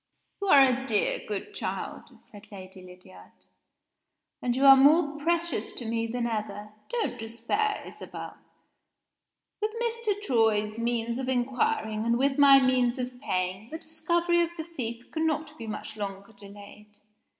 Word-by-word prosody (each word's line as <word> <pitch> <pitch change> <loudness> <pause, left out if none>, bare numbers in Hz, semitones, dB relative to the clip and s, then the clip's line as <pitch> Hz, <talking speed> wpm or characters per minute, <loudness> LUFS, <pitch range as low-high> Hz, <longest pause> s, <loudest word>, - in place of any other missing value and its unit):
"You 400 - -2
are 280 -6 +8
a 265 +1 0
dear 215 -4 +1
good 210 - -5
child," - - -6
said 205 0 -16
Lady 190 -1 -10
Lydiard; 180 - -15 1.1
"and 245 -1 0
you 270 +2 +2
are 270 0 +11
more 295 +2 +4
precious 340 +2 -1
to 245 - -7
me 230 0 -1
than 240 +1 -2
ever. 210 -2 -4 0.2
Don't 475 -2 -2
despair, 235 - -2
Isabel. - - -9 1.3
With 425 - +1
Mr. 465 -3 -1
Troy's 220 - +1
means 235 0 -1
of 260 -1 -3
inquiring, 240 -4 0
and 235 +1 +2
with 270 +2 +1
my 275 -1 +8
means 255 -1 +2
of 250 0 -5
paying, 185 -2 -2
the 320 - -5
discovery 340 +2 0
of 340 - +1
the 320 - -3
thief 245 -8 -7
cannot 315 -1 -1
be 230 - -7
much 215 0 -6
longer 200 0 -6
delayed. 205 +1 -14
240 Hz, 150 wpm, -27 LUFS, 215-300 Hz, 1.3 s, are